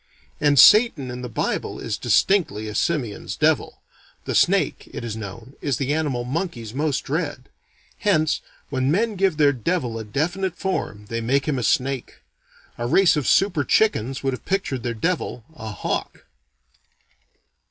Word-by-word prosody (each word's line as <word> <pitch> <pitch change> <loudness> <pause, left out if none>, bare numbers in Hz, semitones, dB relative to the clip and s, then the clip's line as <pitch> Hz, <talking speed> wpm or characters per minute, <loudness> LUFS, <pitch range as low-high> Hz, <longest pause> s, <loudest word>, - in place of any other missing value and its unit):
_ - - -40 0.4
And 145 -1 +3
Satan 165 - +6
in 125 0 -6
the 125 - -5
Bible 115 - -2
is 115 -2 -3
distinctly 120 - +1
a 105 - -5
simian's 135 -7 -2
devil. - - 0 0.4
The - - -2
snake, - - +2
it - - -6
is 115 -2 -4
known, 110 +4 -8
is 140 -5 0
the 140 +1 -1
animal 145 -6 -1
monkeys 125 - -4
most 145 0 0
dread. 145 -3 -3 0.5
Hence 155 -8 +2 0.3
when 130 -1 0
men 215 +7 +1
give 190 -4 +1
their 145 -2 +4
devil 125 -3 -2
a - - -5
definite 175 - -2
form 135 - -3
they 115 0 -2
make 135 +5 +1
him 140 -4 0
a - - -3
snake. 130 +3 0 0.6
A 120 - -1
race 180 +6 +5
of 150 -4 -1
super 185 -7 +3
chickens 135 - +1
would 135 -1 0
have 130 - -7
pictured 190 -10 -1
their 120 0 -3
devil 150 -2 -2
a 110 -6 -7
hawk. 105 - -4
135 Hz, 165 wpm, -23 LUFS, 120-170 Hz, 0.6 s, Satan